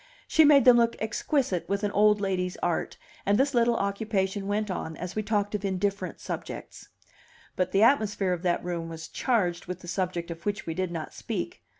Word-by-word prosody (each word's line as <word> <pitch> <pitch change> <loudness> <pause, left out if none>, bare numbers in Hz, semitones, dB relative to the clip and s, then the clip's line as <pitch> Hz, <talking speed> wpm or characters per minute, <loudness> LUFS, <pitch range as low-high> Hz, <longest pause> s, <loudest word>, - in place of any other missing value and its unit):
She 320 - +5
made 290 -2 +6
them 250 -1 +8
look 235 0 +3
exquisite 220 - -1
with 200 +1 -1
an 205 - 0
old 210 +1 +4
lady's 185 -2 -1
art, 175 -2 -1 0.3
and 200 +1 +2
this 275 +3 +2
little 235 -1 +3
occupation 200 -1 -1
went 210 0 -1
on 160 -3 -4
as 180 +1 -6
we 215 - 0
talked 205 -1 -1
of 210 -1 -2
indifferent 195 0 -2
subjects. - - -7 0.7
But 185 -1 0
the 195 +2 +4
atmosphere 210 -7 +3
of 175 - -4
that 175 -2 0
room 170 -2 -3
was 160 0 -7
charged 180 -10 0
with 180 0 -5
the 175 - -11
subject 175 -1 -2
of 165 0 -8
which 205 0 -2
we 165 - -3
did 185 +1 -2
not 165 -2 -5
speak. - - -5
200 Hz, 200 wpm, -27 LUFS, 180-215 Hz, 0.7 s, them